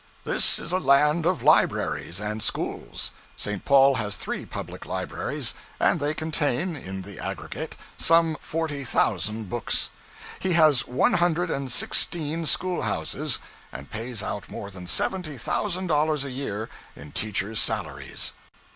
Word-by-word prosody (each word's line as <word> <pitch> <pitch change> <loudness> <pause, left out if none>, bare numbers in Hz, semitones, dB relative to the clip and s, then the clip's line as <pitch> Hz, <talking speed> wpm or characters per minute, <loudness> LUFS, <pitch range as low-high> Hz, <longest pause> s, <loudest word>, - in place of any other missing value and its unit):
This - - +4
is 170 - -3
a 185 - +2
land 150 +3 +4
of 180 -1 +1
libraries 85 - +3
and 105 +1 -3
schools. - - -2 0.3
St. 105 -2 -3
Paul 140 0 +6
has 105 -1 -3
three - - -4
public - - -7
libraries, - - -2 0.3
and 170 - +3
they 145 +1 0
contain, 160 +1 0
in 95 -8 -6
the 100 0 -9
aggregate, - - -5 0.2
some 165 -1 +4
forty 155 -3 -2
thousand 110 -2 0
books. 120 +4 -1 0.5
He 185 -1 +1
has 155 -7 +5
one 125 - +3
hundred 175 -1 +2
and 135 -2 -2
sixteen 160 +4 +1
school 185 +2 +1
houses, - - -1 0.3
and 70 +3 -9
pays 115 0 -3
out 100 - -4
more 100 - -6
than 90 -2 -9
seventy 155 - 0
thousand 185 - -1
dollars 150 -3 +2
a 135 - -5
year 115 -5 -3 0.3
in 70 +1 -10
teachers' 105 +2 -1
salaries. - - -1
140 Hz, 145 wpm, -26 LUFS, 105-165 Hz, 0.5 s, Paul